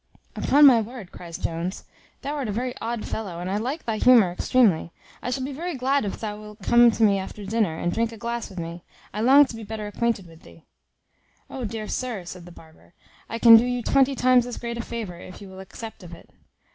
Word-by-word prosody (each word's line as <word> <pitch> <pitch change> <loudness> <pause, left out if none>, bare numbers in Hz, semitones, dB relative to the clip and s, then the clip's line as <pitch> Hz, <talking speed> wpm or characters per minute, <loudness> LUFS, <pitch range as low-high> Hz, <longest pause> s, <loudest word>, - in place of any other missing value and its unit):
"Upon 290 +2 +5
my 245 -5 +7
word," 220 -4 -9
cries 170 -2 -9
Jones, 170 +3 -4 0.4
"thou 285 - -3
art 280 -5 -3
a - - -2
very 245 +4 -3
odd 230 -1 -3
fellow, 190 -6 -5
and 175 - -5
I 200 - 0
like 260 +9 -4
thy 225 -2 -2
humour 230 -6 +5
extremely; 180 -3 +2 0.3
I - - -4
shall 260 +1 -2
be 275 +2 -4
very 340 +4 -4
glad 270 0 0
if 195 - -5
thou 210 -1 -5
wilt 210 -1 -13
come 240 +3 +6
to 225 0 0
me 200 -2 +4
after 200 +2 -8
dinner, 200 -6 0
and 175 +1 -2
drink 230 0 0
a 225 - -10
glass 235 +1 -4
with 190 - -13
me; 170 +1 -6 0.3
I 210 - -3
long 275 +5 +7
to 245 - -9
be 225 - -8
better 215 0 -6
acquainted 210 -1 -1
with 165 -1 -16
thee." 165 - -17 0.9
"O 260 -3 -5
dear 215 0 -5
sir!" 235 -8 -4
said 180 0 -9
the - - -11
barber, 160 +1 -18 0.3
"I 230 - -3
can 230 -1 +9
do 225 - +3
you 245 -1 -2
twenty 270 +2 +3
times 250 -1 +3
as 245 - -6
great 235 0 -5
a - - 0
favour, 220 -7 -6
if 185 - -11
you 200 - -11
will 190 0 -11
accept 220 +4 -10
of 175 -2 -10
it." - - -19
225 Hz, 235 wpm, -24 LUFS, 190-245 Hz, 0.9 s, can